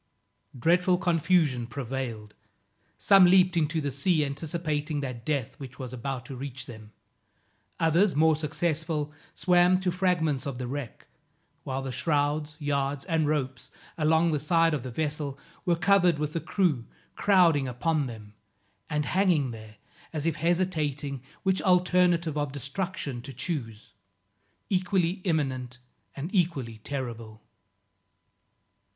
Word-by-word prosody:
Dreadful 180 +6 +3
confusion 165 -8 +2
prevailed. 120 -4 -5 0.6
Some 195 -2 +6
leaped 180 0 +5
into 160 0 +1
the 145 -2 -2
sea, 150 +3 +1
anticipating 150 0 -2
that 125 -4 -5
death 140 -4 -2
which 135 -1 -9
was 130 -2 -7
about 130 +1 -4
to 135 - -7
reach 130 -1 -6
them; 110 -3 -11 0.9
others, 170 +4 +3
more 160 +1 +4
successful, 155 0 -2 0.2
swam 180 0 +4
to 185 -1 0
fragments 170 -6 0
of 135 -3 -4
the 125 - -4
wreck; 130 -2 -6 0.6
while 135 0 -3
the 135 - -4
shrouds, 150 +2 0
yards 145 0 -1
and 160 -4 +1
ropes, 130 -4 -2 0.3
along 160 +1 +3
the 150 - 0
side 165 +2 +3
of 145 - -1
the 130 - -6
vessel, 145 +1 -3 0.3
were 175 -2 +3
covered 180 -2 +4
with 150 0 -3
the 165 - -1
crew 160 - 0 0.3
crowding 170 -9 +4
upon 140 +4 0
them, 110 -3 -10 0.6
and 150 -1 0
hanging 175 -9 +2
there, 110 -1 -10 0.4
as 155 -2 -3
if 165 -1 0
hesitating 155 -5 -1 0.2
which 190 -1 +2
alternative 180 -3 +3
of 145 -2 -2
destruction 145 -1 -4
to 135 - -8
choose, 120 - -5 0.7
equally 185 -1 0
imminent 130 -7 -1 0.4
and 150 +8 -5
equally 140 - 0
terrible. 115 -4 -6
150 Hz, 130 wpm, -27 LUFS, 130-170 Hz, 0.9 s, Some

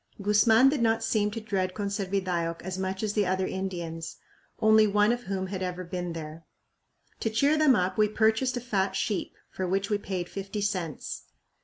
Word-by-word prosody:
Guzman 210 +5 +5
did 280 -3 -1
not 225 -1 +2
seem 210 -2 +1
to 220 +2 -5
dread 190 -4 -2
Conservidayoc 190 -4 -2
as 185 +1 -4
much 190 +1 -3
as 210 -1 -1
the 210 -3 +1
other 185 0 0
Indians, 175 -4 -4 0.4
only 220 0 +5
one 210 +2 +3
of 245 0 -3
whom 190 0 -2
had 190 0 -5
ever 180 0 -3
been 175 0 -4
there. 160 0 -7 0.8
To 225 - 0
cheer 280 +8 +3
them 305 -4 +5
up 185 +2 0
we 215 - +5
purchased 220 +4 +1
a - - -3
fat 200 -5 -1
sheep, 205 -5 -2 0.2
for 185 - -3
which 195 +3 -1
we 205 - +2
paid 185 -3 -4
fifty 195 +2 -5
cents. 185 -7 -3
195 Hz, 185 wpm, -28 LUFS, 185-220 Hz, 0.8 s, Guzman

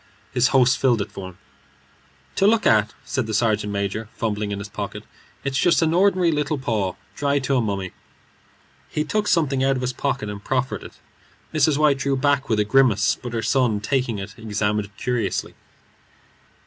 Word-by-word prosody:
His 125 -1 +3
host 130 -1 +3
filled 125 -4 +3
it - - -13
for 95 -1 -7
him. 90 - -16 1.0
"To 195 - +4
look 225 +1 +3
at," 110 0 +3
said 130 -4 -2
the 110 - -2
sergeant 105 -2 +1
major, 100 +2 -3
fumbling 105 -2 -2
in 100 - -2
his 100 +1 -6
pocket, 100 - -6 0.4
"it's 135 -1 -1
just 170 -1 +3
an 160 0 +2
ordinary 185 -1 +3
little 150 0 -1
paw, 110 -8 -1 0.2
dried 140 -1 0
to 135 +1 +1
a 125 - +3
mummy." 100 -4 -3 1.0
He 150 - -1
took 210 +5 -1
something 140 -7 +2
out 135 0 +3
of 130 - -3
his 125 +1 -1
pocket 135 -5 -2
and 100 0 -7
proffered 130 0 -1
it. - - -11 0.6
Mrs. 155 -1 +3
White 150 -3 +3
drew 140 -1 0
back 140 0 +1
with 110 -2 +2
a 105 - +2
grimace, 105 -3 +3
but 120 -1 -6
her 115 -1 -2
son, 115 -2 +2
taking 120 +1 -1
it, 100 +1 -7
examined 105 -1 -1
it 100 - -19
curiously. 125 -2 -2
125 Hz, 185 wpm, -23 LUFS, 105-140 Hz, 1.0 s, To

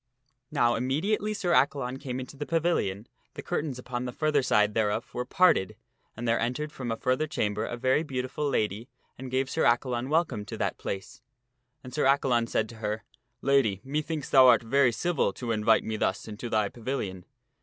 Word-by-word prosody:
Now 120 -5 +2
immediately 165 - 0
Sir 185 -4 0
Accalon 135 -3 +1
came 130 -3 -4
into 130 +2 -8
the 145 +1 -5
pavilion, 165 - 0 0.3
the - - -7
curtains 145 -4 -2
upon 125 0 -4
the 125 - -3
further 150 +2 +1
side 105 -4 +2
thereof 110 +1 -1
were 125 - -3
parted 155 - +3 0.4
and 120 +1 -4
there 115 0 +2
entered 125 +6 -2
from 125 -4 -6
a 115 - -2
further 130 +6 0
chamber 105 -5 -1
a 120 - -4
very 130 +4 +2
beautiful 140 0 -3
lady 110 -1 -1 0.3
and 130 0 -6
gave 130 +1 0
Sir 160 - -1
Accalon 120 +1 +1
welcome 155 -9 +1
to - - -7
that - - -2
place. 95 +2 -6 0.6
And 125 - -10
Sir 150 - +1
Accalon 130 -4 +3
said 110 - 0
to 115 - -11
her, 105 -1 -3 0.2
" - - -49
Lady, 135 -8 +3
methinks 150 +2 -3
thou 130 -1 +8
art 125 - +6
very 130 +2 +3
civil 170 +7 0
to 120 -2 -4
invite 110 0 +3
me 110 0 -3
thus 95 -1 -1
into 110 +2 -6
thy 110 -2 +2
pavilion." 110 -5 -4
125 Hz, 190 wpm, -28 LUFS, 110-140 Hz, 0.6 s, thou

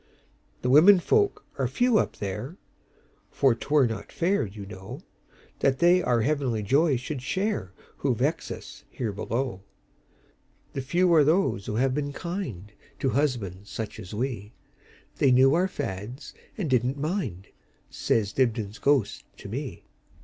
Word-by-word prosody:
"The 125 - +1
women 180 +8 +8
folk 410 - +1
are - - +2
few 245 -3 +3
up - - -2
there; 115 - -5 0.7
For 135 -3 +3
't 115 - -9
were 145 -3 +5
not 110 -3 -4
fair, 180 - +1
you 100 0 -9
know, 95 -1 -9 0.6
That 135 -1 +2
they 175 +4 +5
our 120 -8 +2
heavenly 130 -5 0
joy 140 - +3
should 130 +3 -5
shareWho 185 - -2
vex - - -1
us - - -9
here 115 -4 -3
below. 115 +1 -3 1.1
The 135 - -2
few 175 +6 +2
are 155 -3 +6
those 155 - +1
who 105 - -2
have 130 +3 +2
been 145 0 -2
kindTo 135 - -5
husbands 105 -9 -1
such 110 -2 -5
as 95 - -9
we; 110 -2 -4 0.6
They 140 - +4
knew 130 +2 +6
our 180 +3 +3
fads, 120 - -6 0.2
and 195 -7 -2
did 125 -4 +3
n't 130 +3 -2
mind,"Says 115 - -3
Dibdin's 115 -3 0
ghost 140 -7 +1
to - - -10
me. - - -6
130 Hz, 145 wpm, -26 LUFS, 105-155 Hz, 1.1 s, women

